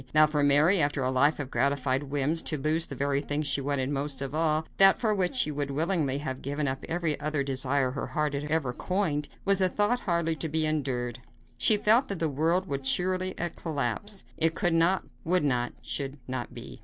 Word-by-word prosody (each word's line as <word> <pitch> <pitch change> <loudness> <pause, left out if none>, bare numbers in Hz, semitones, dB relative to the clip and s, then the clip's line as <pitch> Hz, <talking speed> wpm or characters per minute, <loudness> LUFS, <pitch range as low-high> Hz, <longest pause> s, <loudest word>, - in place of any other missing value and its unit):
Now 155 0 +8
for 150 -1 -1
Mary, 150 +6 +4
after 145 -1 +1
a 130 - 0
life 145 +4 +3
of 135 -3 -5
gratified 135 +1 +1
whims, 145 +3 -1
to 155 - -2
lose 155 +4 +1
the 135 - -7
very 140 +1 0
thing 145 +1 -2
she 140 -1 0
wanted 140 -1 -1
most 140 0 -2
of 135 0 -4
all 155 0 +1
that 195 0 +6
for 220 -3 +1
which 190 +2 0
she 155 - +1
would 145 -1 -3
willingly 150 -2 0
have 130 -3 -5
given 145 +2 -2
up 135 0 -3
every 165 -3 -1
other 150 -1 -1
desire 135 0 0
her 135 - -4
heart 150 -1 -1
had 140 +1 -3
ever 150 -5 -1
coined 160 -3 -1 0.2
was 195 -1 +2
a 185 - +3
thought 210 +6 +1
hardly 170 -5 0
to 160 +2 -2
be 160 +1 +1
endured. 130 -5 -2 0.4
She 210 - +4
felt 225 +6 +4
that 200 - -4
the 160 -1 0
world 165 +6 +1
would 140 -3 -3
surely 185 +4 +1 0.2
collapse. 160 - -2
It 165 0 +2
could 175 -3 +1
not, 170 +3 +3 0.2
would 180 0 +1
not, 125 -4 0
should 140 0 -4
not 130 -1 -4
be. - - -10
150 Hz, 210 wpm, -28 LUFS, 140-170 Hz, 0.4 s, Now